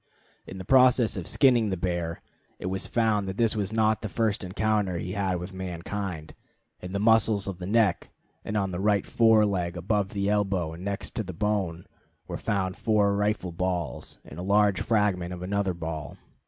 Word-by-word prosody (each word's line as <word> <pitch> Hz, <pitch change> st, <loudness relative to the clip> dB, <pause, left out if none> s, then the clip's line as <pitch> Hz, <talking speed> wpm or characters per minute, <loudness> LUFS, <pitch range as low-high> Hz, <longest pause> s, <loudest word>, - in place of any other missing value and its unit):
In 95 Hz, -, -8 dB
the 95 Hz, -, -7 dB
process 125 Hz, 0 st, +5 dB
of 95 Hz, -4 st, -5 dB
skinning 120 Hz, -6 st, +4 dB
the 95 Hz, -, -2 dB
bear, 85 Hz, -2 st, -3 dB, 0.3 s
it -, -, -8 dB
was 95 Hz, +1 st, -2 dB
found 110 Hz, -4 st, +1 dB
that 95 Hz, +1 st, -5 dB
this 115 Hz, -1 st, +2 dB
was 105 Hz, -2 st, -2 dB
not 110 Hz, -1 st, +2 dB
the 110 Hz, -, -4 dB
first 110 Hz, -1 st, 0 dB
encounter 100 Hz, -1 st, 0 dB
he 90 Hz, +2 st, -4 dB
had 100 Hz, 0 st, -1 dB
had 90 Hz, -, -2 dB
with 90 Hz, +2 st, -7 dB
mankind. 90 Hz, -2 st, -5 dB, 0.5 s
In 90 Hz, -, -8 dB
the 100 Hz, -, -2 dB
muscles 110 Hz, -2 st, +3 dB
of 95 Hz, -2 st, -5 dB
the 90 Hz, -, -5 dB
neck, 105 Hz, -4 st, +2 dB, 0.3 s
and 105 Hz, -, -2 dB
of 95 Hz, -2 st, 0 dB
the 90 Hz, -, -4 dB
right 100 Hz, 0 st, +2 dB
fore 110 Hz, -2 st, +4 dB
leg 90 Hz, -3 st, -2 dB
above 100 Hz, +3 st, 0 dB
the 100 Hz, -1 st, -2 dB
elbow 95 Hz, -5 st, 0 dB
and 85 Hz, +3 st, -9 dB
next 100 Hz, 0 st, -3 dB
to 110 Hz, -, 0 dB
the 90 Hz, -2 st, -7 dB
bone, 95 Hz, -3 st, -1 dB, 0.4 s
were -, -, -4 dB
found 95 Hz, -2 st, -1 dB
four 105 Hz, -2 st, +2 dB
rifle 105 Hz, -3 st, 0 dB
balls, 90 Hz, 0 st, -3 dB
and 75 Hz, -, -10 dB
a -, -, -3 dB
large 100 Hz, 0 st, +3 dB
fragment 95 Hz, -5 st, 0 dB
of 90 Hz, -, -8 dB
another 100 Hz, -1 st, -1 dB
ball. 80 Hz, -4 st, -6 dB
100 Hz, 195 wpm, -27 LUFS, 90-105 Hz, 0.5 s, process